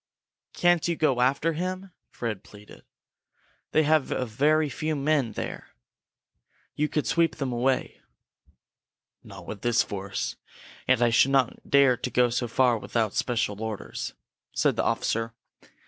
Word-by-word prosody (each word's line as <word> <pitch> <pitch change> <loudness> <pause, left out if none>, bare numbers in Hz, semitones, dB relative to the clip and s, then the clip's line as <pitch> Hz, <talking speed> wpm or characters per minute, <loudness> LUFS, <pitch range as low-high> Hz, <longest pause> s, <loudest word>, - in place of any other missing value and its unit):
"Can't 175 -2 +3
you 170 - 0
go 140 -6 +1
after 140 +6 +2
him?" 185 +3 -4 0.2
Fred 115 -5 -5
pleaded. 105 0 -15 0.9
"They 155 - +4
have 155 -1 +3
very 145 +6 +1
few 155 +2 -2
men 140 -5 +1
there. - - -6 1.0
You 150 0 -1
could 150 - -1
sweep 165 -1 +2
them 135 -4 -3
away." 130 +2 -1 1.2
"Not - - -11
with 100 - -7
this 120 -1 +3
force. 100 -1 -4 0.5
And 125 -2 +4
I 120 - +3
should 120 +3 +5
not 135 -3 0
dare 140 -3 +5
to - - -4
go 125 -1 +2
so 120 +1 -1
far 120 -1 +2
without 105 +1 -1
special 110 -4 -1
orders," 110 -2 -5 0.4
said - - +2
the - - 0
officer. 115 0 -1
130 Hz, 140 wpm, -26 LUFS, 115-155 Hz, 1.2 s, should